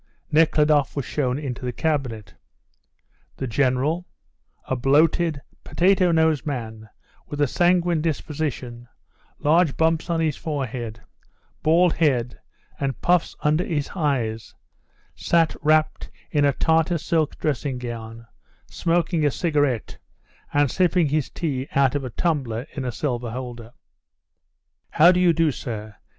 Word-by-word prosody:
Nekhludoff 150 -2 +3
was 140 -4 -2
shown 130 -3 -1
into 135 -4 -5
the 125 - -2
cabinet. 125 -8 -2 1.0
The 135 - -3
General, 135 +7 0 0.6
a 130 - -1
bloated, 150 +4 +2 0.2
potato 185 0 +2
nosed 160 -3 +2
man, 110 -6 -5 0.4
with 145 - -6
a 145 - +4
sanguine 175 +2 +2
disposition, 140 -6 -4 0.5
large 160 0 +2
bumps 160 +1 +1
on 170 -1 0
his 155 -3 0
forehead, 125 -8 -4 0.6
bald 170 +2 +4
head, 125 -7 0 0.4
and 135 -2 -2
puffs 175 -1 +2
under 155 +3 +2
his 150 -6 -3
eyes, 120 - -2 0.6
sat 165 -2 +1
wrapped 155 +1 +1 0.2
in 145 -2 +2
a 140 - +3
Tartar 165 +4 +2
silk 160 -1 -1
dressing 140 -2 -2
gown 115 -1 -7 0.4
smoking 170 -1 0
a 145 - +4
cigarette 145 - -1 0.5
and 145 -2 +2
sipping 180 -3 +2
his 150 -1 0
tea 140 -5 -3
out 135 -2 +3
of 145 -1 -2
a 130 - -4
tumbler 130 -5 -2
in 135 -3 -5
a 125 - -2
silver 120 -2 -3
holder. 120 -1 -7 1.2
"How 170 +3 +6
do 180 - +1
you 180 -1 +5
do, 165 -1 +2
sir? 110 -5 -7
145 Hz, 130 wpm, -23 LUFS, 125-160 Hz, 1.2 s, How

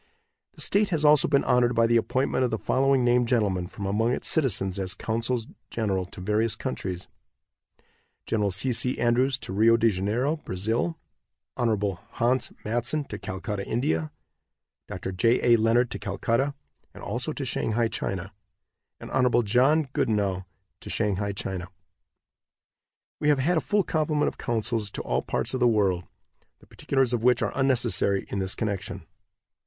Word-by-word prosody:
The - - -9
state 205 0 +2
has 160 -4 0
also 150 -1 +6
been 140 -1 +3
honored 125 -1 +2
by 115 0 +4
the 120 +1 +2
appointment 130 +3 0
of 125 - +1
the 110 - -1
following 135 +2 +2
named 120 0 +3
gentlemen 100 -7 +1
from 100 +1 -7
among 110 +5 +1
its - - -2
citizens 100 - +1
as 95 -1 -2
consuls 115 +1 -2 0.2
general 95 -5 -1
to 95 - -11
various 105 +4 0
countries: 90 +7 -5 1.2
Gen. 105 -2 0
C. 105 +8 0
C. 125 +2 0
Andrews 125 +3 +2
to 95 - -8
Rio 115 +3 +5
de 115 -1 +3
Janeiro, 110 - 0
Brazil; 115 - -2 0.6
Hon. 105 -6 0
Hans 125 +3 +1
Mattson 120 +7 0
to 105 - -6
Calcutta, 100 +2 -4
India; 80 - -1 0.8
Dr. 90 +1 -5
J. 115 +7 +2
A. - - +8
Leonard 115 +2 +2
to - - -5
Calcutta, 115 +8 -1 0.4
and - - -11
also - - -3
to - - -4
Shanghai, 115 +1 0
China; 95 -3 -4 0.7
and - - -9
Hon. 125 -2 +3
John 130 +9 +3
Goodenow 100 -7 0 0.3
to - - -10
Shanghai, 100 -2 -1
China. 95 -2 -4 1.5
We 150 - +1
have 145 - +4
had 155 +7 +1
a - - +2
full 205 -1 +1
complement 155 -3 0
of - - -15
consuls 115 -2 -1
to - - -4
all - - 0
parts - - -2
of 130 - -1
the 125 - +4
world, 95 -6 +1 0.5
the - - -21
particulars 135 -3 0
of 120 - 0
which 125 +1 +3
are - - -1
unnecessary 120 -7 +1
in 100 - -2
this 95 0 -1
connection. 105 -4 -4
115 Hz, 160 wpm, -26 LUFS, 100-130 Hz, 1.5 s, A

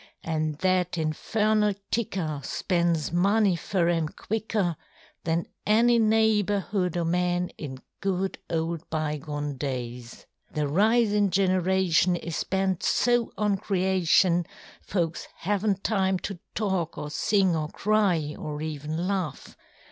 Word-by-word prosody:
AnŌĆÖ 155 -2 -1
that 185 -2 +1
infernal 210 +6 +1 0.2
ticker 175 -10 -1
spends 170 -1 0
money 200 +2 +3
fur 170 +2 0
ŌĆÖem 165 -2 0
quicker 210 -5 -1 0.5
Than 165 +1 0 0.2
any 235 +3 +4
neighbourhood 210 -4 +2
oŌĆÖ 175 -1 -1
men 180 +1 +1
in 130 -4 -8 0.2
good 190 -1 -1
old 165 0 -2
bygone 150 -2 -3
days. 125 -3 -5 0.3
The 150 - 0
risinŌĆÖ 205 +6 +3
generation 185 -2 +2
is 170 -2 -3
bent 190 -1 0
so 240 -1 +2
on 205 -1 +1
creation, 185 -2 +2 0.3
Folks 170 -4 -2 0.2
havenŌĆÖt 200 +1 0
time 190 -3 +1
to 190 0 -6 0.2
talk 190 -6 -1
or 150 - -5
sing 190 +3 +2
or 155 -1 -1
cry 190 -9 +1
or 150 -1 -5
even 155 +3 -3
laugh. 185 -8 -3
180 Hz, 115 wpm, -26 LUFS, 160-200 Hz, 0.5 s, any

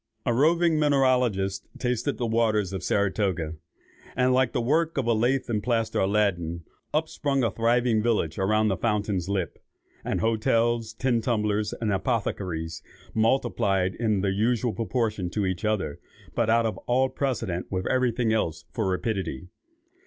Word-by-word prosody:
"A 120 - +2
roving 160 +4 +3
mineralogist 125 -9 +2
tasted 125 +2 -1
the 120 - -1
waters 110 -4 +1
of 95 - -3
Saratoga, 95 -4 0 0.6
and, 125 0 +3
like 130 -1 +3
the - - -1
work 155 +7 +1
of 135 - +1
a 120 - +3
lath 125 +5 +1
and 110 -4 -1
plaster 115 0 0
Aladdin, 95 -5 0 0.3
up 155 +1 +1
sprung 140 -4 -1
a 115 - +1
thriving 115 0 +2
village 105 -8 0
around 105 +2 +2
the 95 - 0
fountain's 105 -5 -1
lip; 95 -4 -2 0.4
and - - -1
hotels, 115 0 +1
tin 120 0 0
tumblers, 105 -3 0
and 110 -3 0
apothecaries, 90 -7 -2 0.3
multiplied 105 -5 +1
in 110 -4 0
the 100 -1 +1
usual 115 +3 +1
proportion 110 -5 -1
to 100 +2 -1
each 95 -2 -2
other, 105 -9 -1 0.3
but 115 -2 +1
out 115 +1 +4
of 110 - -2
all 130 +2 +3
precedent 115 -11 -2
with 95 -1 -2
every 130 -1 +2
thing 115 -1 0
else 85 -7 -1
for 110 -4 -1
rapidity. 90 - -2
110 Hz, 155 wpm, -26 LUFS, 95-120 Hz, 0.6 s, out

